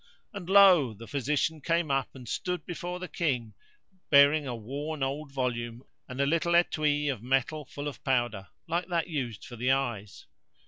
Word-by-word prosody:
And 190 Hz, -4 st, -7 dB
lo! 185 Hz, -, +6 dB
the 115 Hz, +3 st, -10 dB
physician 145 Hz, +3 st, -1 dB
came 165 Hz, 0 st, 0 dB
up 135 Hz, -1 st, 0 dB
and 125 Hz, -2 st, -11 dB
stood 180 Hz, +9 st, -3 dB
before 175 Hz, +1 st, -5 dB
the 185 Hz, 0 st, -6 dB
King, 125 Hz, -12 st, -2 dB, 0.6 s
bearing 140 Hz, +1 st, +6 dB
a 125 Hz, -, -3 dB
worn 140 Hz, +6 st, -4 dB
old 140 Hz, +2 st, -3 dB
volume 120 Hz, -2 st, -3 dB, 0.3 s
and 130 Hz, +1 st, -7 dB
a 140 Hz, -, +3 dB
little 165 Hz, +3 st, +1 dB
etui 150 Hz, -4 st, +2 dB
of 115 Hz, -, -11 dB
metal 135 Hz, +4 st, 0 dB
full 145 Hz, +2 st, -6 dB
of 145 Hz, -, -7 dB
powder, 120 Hz, -7 st, 0 dB, 0.2 s
like 170 Hz, +2 st, -1 dB
that 170 Hz, -2 st, -1 dB
used 125 Hz, -10 st, -4 dB
for 120 Hz, -, -10 dB
the 125 Hz, +3 st, 0 dB
eyes. 120 Hz, -7 st, -1 dB
140 Hz, 175 wpm, -29 LUFS, 125-160 Hz, 0.6 s, lo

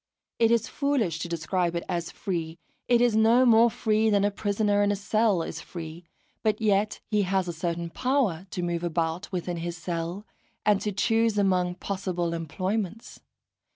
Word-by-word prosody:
It 230 Hz, -, +5 dB
is 235 Hz, -2 st, +2 dB
foolish 255 Hz, -, 0 dB
to 170 Hz, -, -4 dB
describe 170 Hz, +1 st, -1 dB
it 170 Hz, -, -2 dB
as 170 Hz, -2 st, -2 dB
free; 165 Hz, -3 st, -4 dB, 0.3 s
it 240 Hz, -1 st, +4 dB
is 240 Hz, -3 st, +3 dB
no 230 Hz, +4 st, +5 dB
more 230 Hz, 0 st, +6 dB
free 220 Hz, 0 st, +1 dB
than 200 Hz, -1 st, +3 dB
a 205 Hz, -, +1 dB
prisoner 205 Hz, 0 st, +1 dB
in 205 Hz, 0 st, +3 dB
a -, -, +1 dB
cell 205 Hz, -2 st, +1 dB
is 160 Hz, -, -6 dB
free; 165 Hz, +1 st, -8 dB, 0.4 s
but 215 Hz, -2 st, +1 dB
yet 210 Hz, -1 st, +1 dB
he 210 Hz, -1 st, +3 dB
has 190 Hz, -1 st, 0 dB
a 175 Hz, -, -3 dB
certain 170 Hz, 0 st, -3 dB
power 240 Hz, -, 0 dB
to 180 Hz, -, -4 dB
move 170 Hz, -1 st, -2 dB
about 165 Hz, +1 st, -2 dB
within 175 Hz, -1 st, -3 dB
his 170 Hz, +1 st, -4 dB
cell, 170 Hz, +3 st, -4 dB, 0.4 s
and 205 Hz, -1 st, +3 dB
to 210 Hz, -, -1 dB
choose 225 Hz, +2 st, +1 dB
among 180 Hz, -3 st, +2 dB
possible 180 Hz, -3 st, -3 dB
employments. 185 Hz, +6 st, -3 dB
195 Hz, 175 wpm, -27 LUFS, 170-215 Hz, 0.4 s, more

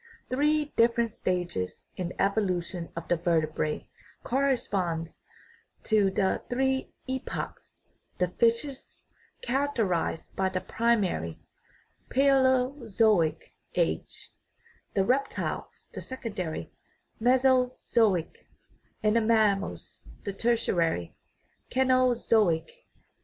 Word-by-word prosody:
Three 295 Hz, +3 st, +1 dB
differ 235 Hz, +1 st, +4 dB
ent 230 Hz, -2 st, -2 dB
stages 175 Hz, -, -3 dB
in 180 Hz, -2 st, -3 dB
the -, -, -12 dB
evolution 185 Hz, -4 st, 0 dB
of 170 Hz, 0 st, -6 dB
the 175 Hz, -, +2 dB
vertebrate 155 Hz, -2 st, 0 dB, 0.4 s
correspond 200 Hz, -11 st, 0 dB, 0.7 s
to 210 Hz, -3 st, +3 dB
the 190 Hz, 0 st, 0 dB
three 265 Hz, +1 st, 0 dB, 0.2 s
epochs; 260 Hz, 0 st, -5 dB, 0.4 s
the 180 Hz, -, +2 dB
fishes 235 Hz, +7 st, -1 dB, 0.4 s
characterized 235 Hz, -, -1 dB
the 185 Hz, -1 st, -1 dB
pri 235 Hz, +1 st, +3 dB
mary 85 Hz, -, -2 dB, 0.7 s
(palaeozoic) 255 Hz, -, +2 dB, 0.2 s
age, -, -, -2 dB, 0.6 s
the 195 Hz, -1 st, +3 dB
reptiles 270 Hz, +4 st, -2 dB
the -, -, -6 dB
secondary 205 Hz, -11 st, -5 dB, 0.5 s
(meso 255 Hz, +1 st, +3 dB
zoic), 205 Hz, -8 st, +1 dB, 0.6 s
and 215 Hz, +1 st, +3 dB
the 230 Hz, -, +4 dB
mammals 215 Hz, -3 st, +1 dB, 0.2 s
the 200 Hz, -, -3 dB
tertiary 175 Hz, -, 0 dB, 0.5 s
(caenozoic). 245 Hz, -8 st, +3 dB
220 Hz, 90 wpm, -28 LUFS, 180-255 Hz, 0.7 s, differ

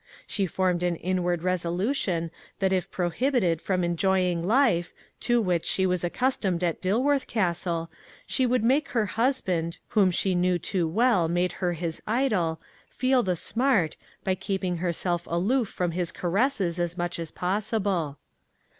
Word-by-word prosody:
She 195 Hz, -3 st, -1 dB
formed 180 Hz, 0 st, 0 dB
an 175 Hz, -1 st, +1 dB
inward 175 Hz, -1 st, -1 dB
resolution 180 Hz, -, -1 dB, 0.3 s
that 190 Hz, -1 st, +1 dB
if 185 Hz, -2 st, 0 dB
prohibited 180 Hz, -, 0 dB
from 185 Hz, -2 st, 0 dB
enjoying 180 Hz, 0 st, +1 dB
life, 220 Hz, -8 st, +3 dB, 0.3 s
to 240 Hz, -1 st, +2 dB
which 180 Hz, -6 st, +1 dB
she 190 Hz, -, +1 dB
was 180 Hz, -1 st, 0 dB
accustomed 185 Hz, -2 st, 0 dB
at 170 Hz, -2 st, -1 dB
Dilworth 260 Hz, +9 st, +1 dB
Castle, 170 Hz, -5 st, -1 dB, 0.4 s
she 260 Hz, -, +1 dB
would 250 Hz, -2 st, +1 dB
make 270 Hz, +5 st, +3 dB
her 220 Hz, -, +3 dB
husband, 190 Hz, -8 st, 0 dB
whom 200 Hz, -3 st, +4 dB
she 185 Hz, +1 st, 0 dB
knew 180 Hz, 0 st, +2 dB
too 175 Hz, 0 st, -1 dB
well 205 Hz, -1 st, +3 dB
made 175 Hz, +2 st, +1 dB
her 175 Hz, -1 st, +1 dB
his 165 Hz, -1 st, -4 dB
idol, 210 Hz, -9 st, +1 dB, 0.3 s
feel 255 Hz, 0 st, +2 dB
the 185 Hz, -5 st, 0 dB
smart, 225 Hz, -, +1 dB, 0.3 s
by 190 Hz, -, +1 dB
keeping 190 Hz, -2 st, -2 dB
herself 175 Hz, 0 st, -1 dB
aloof 215 Hz, +9 st, +1 dB
from 180 Hz, -2 st, -2 dB
his 175 Hz, 0 st, -2 dB
caresses 185 Hz, -2 st, 0 dB
as 175 Hz, 0 st, -2 dB
much 175 Hz, 0 st, -2 dB
as 165 Hz, -2 st, -4 dB
possible. 190 Hz, -5 st, -1 dB
185 Hz, 150 wpm, -26 LUFS, 175-215 Hz, 0.4 s, whom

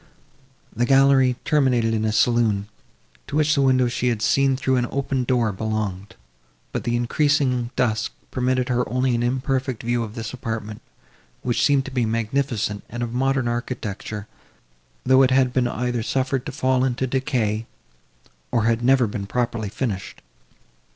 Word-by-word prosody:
The 120 Hz, +2 st, +1 dB
gallery 135 Hz, -2 st, +5 dB
terminated 125 Hz, -6 st, +2 dB
in 110 Hz, -1 st, 0 dB
a 110 Hz, -, +1 dB
saloon, 110 Hz, -2 st, +2 dB, 0.6 s
to -, -, -5 dB
which 150 Hz, 0 st, +3 dB
the 140 Hz, -, +2 dB
window 130 Hz, -2 st, +3 dB
she 120 Hz, +1 st, -1 dB
had 115 Hz, -3 st, 0 dB
seen 135 Hz, -1 st, +3 dB
through 130 Hz, -2 st, +1 dB
an 120 Hz, -1 st, 0 dB
open 135 Hz, -2 st, -1 dB
door, 120 Hz, -3 st, +1 dB
belonged; 105 Hz, -1 st, -4 dB, 0.6 s
but -, -, -4 dB
the 120 Hz, -, 0 dB
increasing 125 Hz, 0 st, +1 dB
dusk 110 Hz, -3 st, 0 dB, 0.2 s
permitted 130 Hz, 0 st, 0 dB
her 125 Hz, -3 st, 0 dB
only 130 Hz, +2 st, +1 dB
an 120 Hz, -, 0 dB
imperfect 130 Hz, 0 st, -1 dB
view 120 Hz, +1 st, 0 dB
of 110 Hz, -1 st, -6 dB
this 115 Hz, -1 st, -5 dB
apartment, 110 Hz, -3 st, -5 dB, 0.6 s
which 120 Hz, -2 st, 0 dB
seemed 140 Hz, -2 st, +3 dB
to 135 Hz, -, -7 dB
be 125 Hz, -3 st, 0 dB
magnificent 115 Hz, -2 st, -1 dB
and 120 Hz, +1 st, -4 dB
of 120 Hz, -1 st, -4 dB
modern 130 Hz, 0 st, +1 dB
architecture; 110 Hz, -4 st, -4 dB, 0.8 s
though 130 Hz, +1 st, +5 dB
it 130 Hz, -, +5 dB
had 130 Hz, -1 st, +3 dB
been 125 Hz, -2 st, +2 dB
either 120 Hz, -1 st, -2 dB
suffered 130 Hz, +2 st, -1 dB
to -, -, -3 dB
fall 130 Hz, -2 st, +1 dB
into 130 Hz, 0 st, 0 dB
decay, 120 Hz, -4 st, -1 dB, 0.8 s
or 115 Hz, -3 st, +2 dB
had 115 Hz, +1 st, +1 dB
never 130 Hz, 0 st, +4 dB
been 100 Hz, -2 st, -5 dB
properly 115 Hz, -2 st, -2 dB
finished. 100 Hz, -4 st, -4 dB
125 Hz, 160 wpm, -23 LUFS, 115-130 Hz, 0.8 s, gallery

